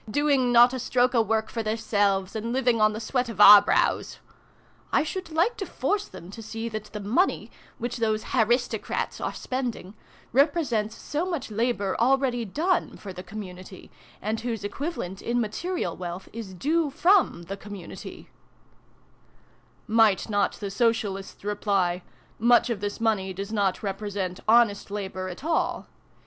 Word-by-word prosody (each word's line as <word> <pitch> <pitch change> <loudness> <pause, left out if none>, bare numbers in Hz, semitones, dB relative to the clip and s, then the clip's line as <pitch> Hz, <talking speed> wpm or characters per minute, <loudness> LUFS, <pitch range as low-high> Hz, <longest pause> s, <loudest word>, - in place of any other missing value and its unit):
Doing 275 -1 +2
not 240 +1 +7
a 260 - -3
stroke 250 +1 +2
o' 235 - +4
work 220 0 -1
for 230 - -2
theirselves, 205 -3 0
and 225 +2 -3
living 245 -3 +2
on 215 0 +5
the 215 - -5
sweat 245 +2 -1
of 215 -3 -8
our 205 0 +11
brows! 205 - +1 0.4
' - - -34 0.3
I - - +3
should 370 +3 -5
like 340 +9 +1
to 390 - -3
force 410 0 -1
them 175 +3 -11
to 225 - -9
see 225 +1 -5
that 215 -1 -5
the 210 0 -8
money, 235 - 0 0.3
which 240 +1 -4
those 220 -2 0
' - - -7
haristo 240 0 +2
crats' - - -3
are - - -1
spending, 245 -7 -4 0.4
represents 250 -6 +2
so 300 +3 -3
much 295 -10 -4
labour 215 -3 0
already 250 -1 +2
done 335 - -1
for 195 -2 -8
the 180 - -7
community, 185 -1 -10 0.3
and 215 +2 -1
whose 230 -3 -4
equivalent, 205 - -4
in 240 +1 0
material 345 - -2
wealth, 180 +1 -7
is 215 -5 -7
due 310 - +1
from 345 - +3
the 190 +4 -6
community" 200 -3 -9 0.8
" - - -34
Might 215 -1 +3
not 205 -1 +1
the 200 -2 -6
Socialists 205 -4 -1
reply 200 -4 0 0.2
' - - -33
Much 240 +1 +4
of 220 - -2
this 205 +2 -4
money 210 -4 0
does 200 +3 -6
not 200 -2 0
represent 195 -2 -3
honest 225 -3 +4
labour 190 -2 -4
at 180 +8 -9
all. 325 +1 0
220 Hz, 165 wpm, -26 LUFS, 200-250 Hz, 0.8 s, our